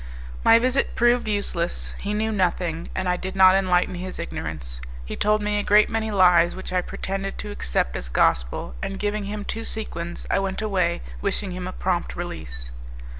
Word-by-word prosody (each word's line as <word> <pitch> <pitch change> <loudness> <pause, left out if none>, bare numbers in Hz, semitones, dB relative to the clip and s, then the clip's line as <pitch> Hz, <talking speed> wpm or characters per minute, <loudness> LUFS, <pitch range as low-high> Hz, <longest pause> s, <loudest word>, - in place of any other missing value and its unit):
My 225 - +8
visit 255 +3 +1
proved 240 0 +3
useless; 200 -5 -1
he 205 +1 -2
knew 220 +1 0
nothing, 175 -4 0
and 190 -1 -1
I 180 0 +2
did 190 +2 -5
not 190 -1 +8
enlighten 185 -2 +2
his 185 +1 -5
ignorance. 75 - -5 0.2
He - - -5
told 210 0 +2
me 210 0 +1
a - - -1
great 210 +2 +5
many 220 -1 -1
lies 180 -4 +5
which 190 0 -7
I 180 - +3
pretended 195 +2 -4
to 210 - -5
accept 60 - -1
as - - -4
gospel, - - +1
and 195 - -3
giving 210 0 -1
him 205 0 -5
two 225 - -3
sequins 175 -7 -4
I - - +3
went 195 -1 -2
away, 190 - 0 0.2
wishing 195 - -1
him 180 0 -5
a - - -4
prompt 180 -2 -1
release. 60 - -6
190 Hz, 185 wpm, -24 LUFS, 175-210 Hz, 0.2 s, My